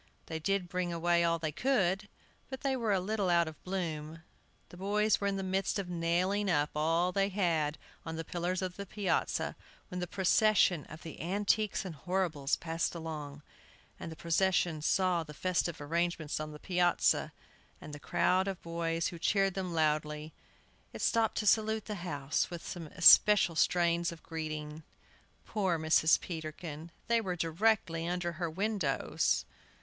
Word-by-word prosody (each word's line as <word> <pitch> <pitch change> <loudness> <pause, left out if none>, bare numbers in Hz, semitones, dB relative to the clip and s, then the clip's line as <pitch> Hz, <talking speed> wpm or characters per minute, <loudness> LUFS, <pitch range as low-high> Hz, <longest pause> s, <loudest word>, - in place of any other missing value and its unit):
They 160 -1 -5
did 195 +2 0
bring 180 0 -2
away 170 0 +2
all 170 0 +2
they 160 -2 -3
could, 205 - +1 0.4
but 265 -1 -6
they 270 -1 0
were 230 -4 -1
a 195 - +3
little 200 0 -1
out 170 -1 +3
of 160 - -10
bloom. 165 -4 -4 0.5
The - - -12
boys 210 +3 +1
were 200 - +1
in 200 - 0
the 195 - -3
midst 190 +2 -1
of 195 -3 -4
nailing 180 +4 0
up 150 -4 +1
all 165 +4 +2
they 195 +1 +1
had 165 -6 0 0.3
on 165 0 -5
the 165 - -4
pillars 180 +3 -2
of 180 -1 -4
the 200 0 -6
piazza 200 +1 -1 0.3
when 180 - -5
the 180 - -3
procession 190 -3 +3
of 155 - -11
the 160 - -8
Antiques 205 +4 0
and 180 - -5
Horribles 160 -4 -1
passed 165 +1 -2
along. 150 -3 -6 0.6
As - - -6
the 160 - -8
procession 170 -1 +1
saw 180 +2 +2
the 150 -2 -9
festive 175 -1 -1
arrangements 165 0 -1
on 155 0 -5
the 150 - -9
piazza, 175 +2 +1 0.5
and 150 - -10
the 145 - -7
crowd 185 +5 +1
of 195 -2 -3
boys, 165 0 -1
who 170 - -9
cheered 195 +1 +2
them 185 -2 -3
loudly, 155 -1 0 0.6
it - - -7
stopped 225 -1 +2
to 215 - -1
salute 220 0 +2
the 215 - -4
house 145 -4 -1
with 175 -2 -7
some 170 -3 -6
especial 185 +2 +6
strains 170 +1 +2
of 165 -2 -11
greeting. 155 -1 -5 0.6
Poor 190 -6 0
Mrs. 160 0 +4
Peterkin! 160 -1 -7 0.2
They 235 -1 +2
were 185 -4 -3
directly 165 -1 +1
under 175 0 -1
her 170 0 -3
windows! 190 -4 0
175 Hz, 165 wpm, -32 LUFS, 160-195 Hz, 0.6 s, especial